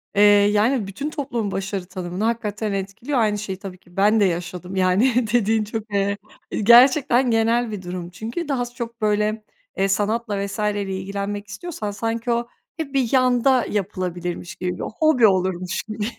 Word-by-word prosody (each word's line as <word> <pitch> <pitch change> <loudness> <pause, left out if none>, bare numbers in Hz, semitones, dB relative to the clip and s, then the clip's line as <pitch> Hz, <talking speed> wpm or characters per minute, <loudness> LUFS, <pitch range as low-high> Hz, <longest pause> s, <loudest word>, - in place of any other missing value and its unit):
Eee, 205 - +4 0.3
yani, 215 +1 +2
bütün 270 +10 -4
toplumun 245 -9 -3
başarı 195 -1 -3
tanımını 185 +1 -5
hakikaten 220 -2 -1
etkiliyor. 205 +8 -2
Aynı 210 -2 +2
şeyi 200 -2 -5
tabii 195 -2 -8
ki 175 0 -23
ben 210 +3 +4
de 205 - +4
yaşadım. 180 +1 -3
Yani, 215 +7 +3
dediğin 220 -2 +3
çok, 215 0 -6
eee, 200 0 +1 0.5
gerçekten 245 +2 +6
genel 230 +1 +2
bir 205 -3 -5
durum. 175 -1 -6
Çünkü 225 - -5
daha 260 -4 0
s 240 - -11
çok 235 -2 -6
böyle, 210 +1 +1 0.3
eee, 195 - +2
sanatla 205 +1 0
vs.yle 205 0 -1
ilgilenmek 200 +2 -4
istiyorsan 220 - -5
sanki 230 +3 -2
o 235 0 0 0.3
hep 310 -4 -5
bir 260 -4 +1
yanda 255 0 +3
yapılabilirmiş 180 -2 -3
gibi, 180 0 -3
bir - - -6 0.2
hobi 310 -8 +5
olurmuş 185 -1 0
gibi. 215 -1 -4
210 Hz, 165 wpm, -22 LUFS, 195-235 Hz, 0.5 s, gerçekten